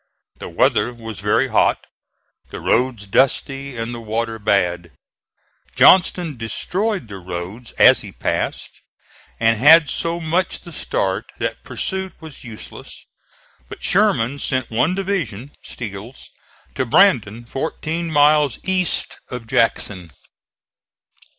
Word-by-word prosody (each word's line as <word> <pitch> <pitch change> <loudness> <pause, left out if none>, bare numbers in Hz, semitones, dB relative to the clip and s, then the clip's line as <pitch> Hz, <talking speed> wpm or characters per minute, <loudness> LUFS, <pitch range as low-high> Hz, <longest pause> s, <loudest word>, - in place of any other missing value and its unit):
The - - -7
weather 120 - +2
was 115 -4 -8
very 105 +1 +1
hot, - - +2 0.6
the - - -7
roads 120 -4 0
dusty 135 +4 0
and 115 +1 -4
the 120 - -6
water 115 0 -3
bad. 90 -6 0 0.8
Johnston 175 -5 +4
destroyed 185 - -2
the 100 -2 -8
roads 90 +6 -7
as - - +6
he - - -9
passed - - -3 0.6
and 115 0 +3
had 150 +4 +7
so 170 +1 -2
much 170 +3 -1
the 170 - -12
start 95 - -2
that - - -4
pursuit 190 0 -3
was 160 -3 -11
useless; 115 -4 -10 0.6
but - - -10
Sherman 120 +6 +2
sent 130 -4 -2
one 140 +11 +1
division, 155 - -3
Steele's, 110 +2 -8 0.4
to 130 - -1
Brandon, 120 - +3
fourteen 160 +6 -4
miles 150 -3 +4
east 185 -2 0
of 125 -2 -6
Jackson. 115 -7 0
125 Hz, 120 wpm, -20 LUFS, 110-160 Hz, 0.8 s, had